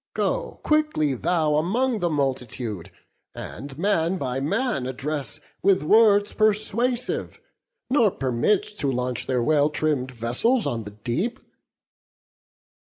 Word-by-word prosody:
Go -, -, -1 dB
quickly 305 Hz, -, +2 dB
thou 155 Hz, +2 st, +1 dB
Among 225 Hz, +9 st, +1 dB
the 175 Hz, -, 0 dB
multitude, 125 Hz, -, -2 dB, 0.5 s
and 135 Hz, +3 st, -8 dB
man 185 Hz, -1 st, +1 dB
by 130 Hz, -4 st, -2 dB
man 145 Hz, -, -1 dB
Address 140 Hz, +3 st, -4 dB, 0.2 s
with 195 Hz, -4 st, +3 dB
words 205 Hz, +3 st, +5 dB
persuasive, 225 Hz, +4 st, 0 dB, 0.5 s
nor 245 Hz, -5 st, +4 dB
permit 135 Hz, -, +1 dB, 0.2 s
To 140 Hz, -, 0 dB
launch 125 Hz, -1 st, -2 dB
their 125 Hz, -2 st, +1 dB
well 150 Hz, +1 st, +3 dB
trimm'd 150 Hz, -4 st, -1 dB
vessels 125 Hz, -, 0 dB
on 115 Hz, -2 st, -2 dB
the 105 Hz, -, -7 dB
deep." 180 Hz, -, -1 dB
155 Hz, 115 wpm, -24 LUFS, 130-210 Hz, 0.5 s, words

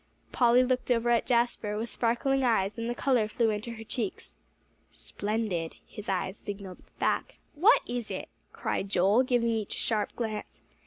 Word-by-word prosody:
Polly 245 Hz, 0 st, +5 dB
looked 255 Hz, 0 st, 0 dB
over 240 Hz, -1 st, +2 dB
at 235 Hz, -, +2 dB
Jasper, 235 Hz, -4 st, +1 dB
with 230 Hz, +2 st, -4 dB
sparkling 260 Hz, +3 st, +1 dB
eyes, 210 Hz, -4 st, +2 dB
and 230 Hz, 0 st, -3 dB
the 240 Hz, -, -2 dB
color 245 Hz, -6 st, +2 dB
flew 225 Hz, +1 st, +1 dB
into 215 Hz, +3 st, -4 dB
her 225 Hz, -1 st, -8 dB
cheeks. 240 Hz, -, -5 dB, 0.5 s
"Splendid!" 205 Hz, -6 st, -3 dB
his 210 Hz, -1 st, -9 dB
eyes 190 Hz, +1 st, -2 dB
signalled 200 Hz, -2 st, -7 dB, 0.2 s
back. -, -, -1 dB, 0.2 s
"What 380 Hz, +11 st, +5 dB
is 240 Hz, -2 st, -3 dB
it?" -, -, -5 dB, 0.2 s
cried 195 Hz, -, -2 dB
Joel, 195 Hz, +5 st, +4 dB
giving 245 Hz, -2 st, +2 dB
each 220 Hz, -3 st, -2 dB
a -, -, -6 dB
sharp 215 Hz, -2 st, 0 dB
glance. 220 Hz, -3 st, -5 dB
230 Hz, 165 wpm, -29 LUFS, 210-245 Hz, 0.5 s, Polly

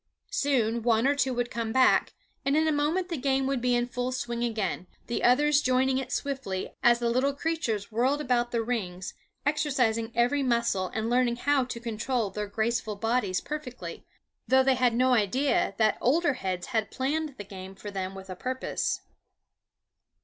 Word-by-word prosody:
Soon 235 Hz, -5 st, +1 dB
one 225 Hz, 0 st, +2 dB
or 280 Hz, -, +4 dB
two 275 Hz, -2 st, +1 dB
would 245 Hz, -1 st, -2 dB
come 230 Hz, -1 st, -2 dB
back, 260 Hz, +2 st, +4 dB, 0.3 s
and 275 Hz, +2 st, +2 dB
in 315 Hz, 0 st, +3 dB
a -, -, +3 dB
moment 310 Hz, +5 st, 0 dB
the 335 Hz, -, -2 dB
game 270 Hz, 0 st, +1 dB
would 270 Hz, -2 st, -1 dB
be 250 Hz, 0 st, +2 dB
in 240 Hz, 0 st, +1 dB
full 250 Hz, +1 st, -3 dB
swing 240 Hz, -2 st, -3 dB
again, 215 Hz, -6 st, -2 dB, 0.2 s
the 235 Hz, -, -3 dB
others 295 Hz, +4 st, +4 dB
joining 260 Hz, 0 st, +2 dB
it 265 Hz, -, -6 dB
swiftly 265 Hz, -10 st, -3 dB
as 240 Hz, 0 st, +5 dB
the 235 Hz, 0 st, -1 dB
little 265 Hz, +4 st, +2 dB
creatures 275 Hz, -10 st, -2 dB
whirled 255 Hz, +6 st, +1 dB
about 245 Hz, -4 st, +1 dB
the 235 Hz, -1 st, -1 dB
rings, 190 Hz, -6 st, -3 dB, 0.3 s
exercising 255 Hz, -7 st, +1 dB
every 245 Hz, +5 st, +2 dB
muscle 235 Hz, -7 st, +1 dB
and 220 Hz, 0 st, -1 dB
learning 245 Hz, 0 st, +2 dB
how 280 Hz, +2 st, +2 dB
to 245 Hz, -1 st, -6 dB
control 230 Hz, -1 st, -2 dB
their 210 Hz, +2 st, -4 dB
graceful 220 Hz, +1 st, -1 dB
bodies 220 Hz, -3 st, 0 dB
perfectly, 295 Hz, -5 st, -6 dB, 0.4 s
though 265 Hz, 0 st, +5 dB
they 265 Hz, 0 st, +4 dB
had 250 Hz, -2 st, +2 dB
no 255 Hz, +1 st, +3 dB
idea 240 Hz, 0 st, +1 dB
that 215 Hz, -2 st, +2 dB
older 290 Hz, +4 st, +3 dB
heads 185 Hz, -6 st, -3 dB
had 220 Hz, -2 st, +1 dB
planned 290 Hz, +2 st, -2 dB
the 205 Hz, -, -6 dB
game 190 Hz, -1 st, -9 dB
for 205 Hz, +1 st, -8 dB
them 190 Hz, -1 st, -4 dB
with 190 Hz, 0 st, -9 dB
a 185 Hz, -, -6 dB
purpose. 255 Hz, +7 st, -2 dB
245 Hz, 180 wpm, -28 LUFS, 220-270 Hz, 0.4 s, as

